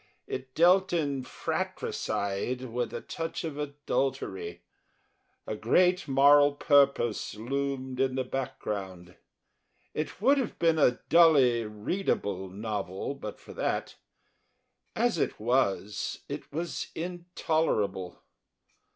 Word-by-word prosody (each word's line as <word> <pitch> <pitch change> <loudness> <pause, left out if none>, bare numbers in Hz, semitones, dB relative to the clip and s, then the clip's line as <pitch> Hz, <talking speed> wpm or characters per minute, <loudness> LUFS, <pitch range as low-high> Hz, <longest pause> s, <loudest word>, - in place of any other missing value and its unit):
It 130 0 -6
dealt 185 +3 +5
in 140 -5 0
fratricide 100 0 -2
with 120 -1 -3
a - - -5
touch 165 +1 -5
of 155 -3 -5
adultery; 135 -11 -3 0.8
a - - -3
Great 180 - +3
Moral 145 +1 +6
Purpose 140 -8 +3
loomed 130 +2 -3
in 130 -1 +1
the 130 - 0
background. 95 -9 -5 0.8
It 155 +2 -4
would 275 +7 +4
have 255 - -3
been 165 -2 +3
a 125 -4 +4
dully 135 -9 +6
readable 105 - -2
novel 100 +2 -4
but 110 -7 -8
for - - -12
that; - - -2 1.0
as - - +1
it - - -1
was, 105 -3 0
it - - -7
was 165 +3 -3
intolerable. 160 - -1
135 Hz, 110 wpm, -29 LUFS, 105-160 Hz, 1.0 s, Moral